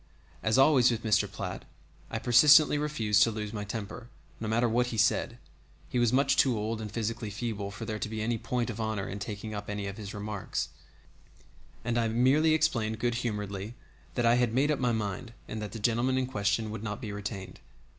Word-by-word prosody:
As 110 +2 +2
always 135 -2 +6
with 115 -2 -2
Mr. 110 -3 +2
Platt, - - -5 0.5
I - - -3
persistently 145 +4 +6
refused 115 -9 +1
to - - +6
lose 105 -1 -5
my 105 -2 -3
temper, 110 +3 -6 0.3
no 110 - -4
matter 120 +3 +2
what 120 +2 +1
he 115 - -4
said 110 +2 +2 0.5
he 125 - 0
was 120 -2 +3
much 135 +2 +3
too 125 -3 +4
old 110 +1 -2
and 105 -1 -6
physically 115 0 -3
feeble 100 -1 -4
for 100 +3 -7
there 110 -1 -4
to 105 - -3
be 110 0 -4
any 115 +1 -1
point 120 0 -2
of 115 - -5
honor 110 -3 -2
in 100 - -5
taking 105 +1 -5
up 105 0 -6
any 105 -1 -3
of 100 +1 -5
his 100 -2 -7
remarks 105 -1 -3 1.2
and 120 -1 +1
I 115 - +1
merely 135 +8 +4
explained 115 -9 +1
good 120 +2 0
humoredly 105 -1 -4 0.4
that 120 - +1
I 115 +1 +5
had 120 -2 +1
made 145 +4 +3
up 150 - 0
my 125 -2 +2
mind 110 +1 -3
and 110 - -5
that 105 - -5
the - - -6
gentleman 120 +4 +1
in 130 - +1
question 105 -2 -1
would 110 - -5
not 105 -1 -4
be 110 -5 -5
retained. 100 -2 -6
110 Hz, 210 wpm, -29 LUFS, 105-120 Hz, 1.2 s, always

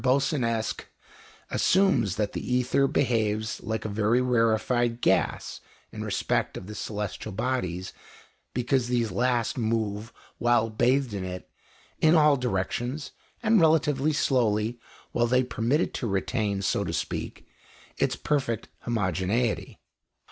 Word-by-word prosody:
Boussinesq 125 -4 +1 0.7
assumes 155 - +3
that 105 -1 -1
the 125 - -3
ether 125 +2 +2
behaves 110 -5 0
like 110 0 -3
a - - 0
very 105 +3 +2
rarefied 120 0 +1
gas - - 0 0.3
in - - -6
respect - - -1
of - - -8
the 105 - -8
celestial 105 0 -4
bodies, 95 -5 -2 0.6
because 125 0 0
these 120 -3 0
last 125 -1 0
move, 110 -1 -1 0.3
while 120 -2 +2
bathed 125 +2 +2
in 100 -2 -3
it, 90 0 -6 0.5
in 160 +1 +5
all 150 -2 +6
directions 125 +4 -2 0.3
and 220 -3 +4
relatively 155 -2 +3
slowly, 120 -5 +1 0.3
while 120 0 +2
they 130 +2 +3
permit 125 +3 0
it - - -2
to 120 - -3
retain, 100 0 -1
so - - +1
to - - -4
speak, - - -4 0.5
its - - +1
perfect 130 -7 -1 0.2
homogeneity. 105 +1 0
120 Hz, 125 wpm, -27 LUFS, 105-130 Hz, 0.7 s, all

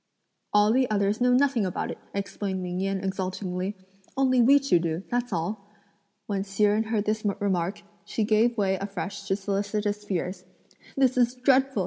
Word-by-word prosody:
"All 210 +1 +4
the 260 0 +2
others 205 +1 +1
know 250 0 +4
nothing 255 -3 +3
about 185 -2 -2
it!" - - -8 0.2
explained 195 -1 -3
Ming 180 0 -3
Yen 195 0 -1
exultingly; 190 0 -3 0.4
"only 260 -2 +4
we 270 +4 +7
two 275 -11 +3
do, 165 +1 -2
that's 245 0 -1
all." 200 +4 -3 0.6
When 200 -2 -2
Hsi 195 +1 -2
Jen 210 +1 +4
heard 220 -2 -1
this 215 0 -1 0.2
remark, 195 -1 -1 0.2
she 215 +2 -2
gave 225 +3 +2
way 190 -2 +1
afresh 195 +1 -5
to 195 - +2
solicitous 205 +1 -2
fears: 185 -1 -3 0.5
"This 260 -2 +3
is 245 0 +3
dreadful!" 265 -1 +3
205 Hz, 165 wpm, -26 LUFS, 190-235 Hz, 0.6 s, we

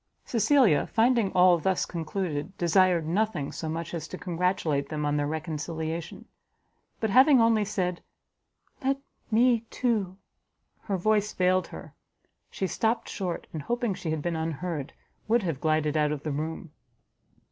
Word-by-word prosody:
Cecilia, 230 - +3
finding 230 -3 +2
all 180 -1 +5
thus 190 +2 0
concluded, 170 0 -4
desired 175 -1 +3
nothing 175 -4 -1
so 160 - -5
much 165 +2 -4
as 165 -2 -4
to 185 - -7
congratulate 170 -6 -1
them 150 -1 -2
on 145 0 +1
their 145 -1 0
reconciliation; 160 +1 -4 0.7
but 220 -2 -1
having 265 +4 +7
only 225 -2 +4
said 185 -4 -2 0.8
"Let 270 +1 +1 0.3
me, 235 +1 +4
too, 210 -7 -1 0.3
" - - -47
her 200 -2 -1
voice 210 +2 +1
failed 185 0 +2
her, - - -10 0.6
she 195 - -3
stopt 225 +5 -1
short, 180 -4 -4
and 155 - -4
hoping 240 - -1
she 175 - -5
had 155 -2 -2
been 175 -1 -1
unheard, 160 -2 -3 0.3
would 230 0 +3
have 160 -7 -3
glided 155 -1 +1
out 150 -1 +2
of 150 -1 -4
the 155 - -2
room. 155 +2 -4
180 Hz, 150 wpm, -27 LUFS, 155-210 Hz, 0.8 s, having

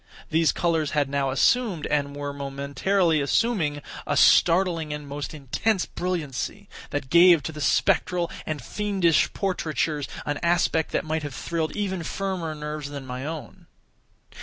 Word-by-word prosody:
These 160 0 +4
colors 165 -4 0
had 145 -2 +2
now 140 -1 0
assumed, 190 - +2
and 145 -1 -1
were 145 0 -4
momentarily 140 +5 0
assuming, 150 - +1 0.2
a - - 0
startling 170 -3 +4
and 150 -1 -5
most 145 +1 -5
intense 165 - -1
brilliancy, 170 -7 -4 0.2
that 145 -3 -4
gave 170 -2 +7
to - - -4
the 150 -1 -8
spectral 175 +3 +2 0.2
and 150 -4 -3
fiendish 190 - +1
portraitures 160 -6 -1 0.2
an 145 0 -2
aspect 170 -2 +1
that - - 0
might 160 0 -1
have 145 -4 -6
thrilled 160 0 -3
even 190 -3 -2
firmer 175 -2 -3
nerves 150 -1 -5
than 140 -2 -7
my 130 +2 -5
own. 160 -2 -8
155 Hz, 145 wpm, -25 LUFS, 145-175 Hz, 0.2 s, gave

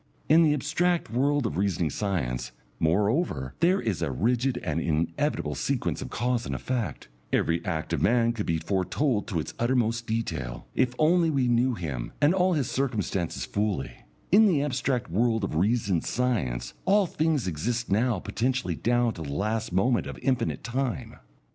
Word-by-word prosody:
In 160 +3 +6
the 160 -2 +5
abstract 170 +1 0
world 140 +3 +1
of 75 - -2
reasoning 90 -5 0
science, 60 - -2 0.3
moreover, 90 - +1
there 185 +3 +3
is 105 - -2
a 85 - 0
rigid 120 - +1
and 80 -1 -1
inevitable 80 0 -1
sequence - - -1
of - - -5
cause 120 -1 -1
and - - -3
effect; 125 - -3 0.2
every 85 +1 +1
act 85 -4 -3
of 80 - 0
man 115 +4 +3
could 105 -3 -4
be 80 - +1
foretold 100 - 0
to 95 -8 -1
its 80 - -5
uttermost 115 -2 +1
detail, 80 - -3
if 125 -1 +1
only 165 +2 +4
we 135 -5 +1
knew 120 +1 +2
him 70 - -5
and 145 +3 +4
all 185 -1 +3
his 145 -7 0
circumstances 105 -10 -2
fully; 100 -8 -1 0.4
in 215 +4 +7
the 155 -8 +2
abstract 130 - -1
world 115 +3 +1
of 95 - -2
reasoned 100 -1 +1
science 65 - -1
all 200 +2 +4
things 155 - 0
exist 115 +9 -2
now 115 +2 +2
potentially 115 +1 -1
down 120 +6 +1
to 80 - -9
the 70 -3 -5
last 110 +7 -1
moment 115 +7 +2
of - - -7
infinite 130 -3 0
time. 130 0 -3
115 Hz, 165 wpm, -27 LUFS, 85-130 Hz, 0.4 s, in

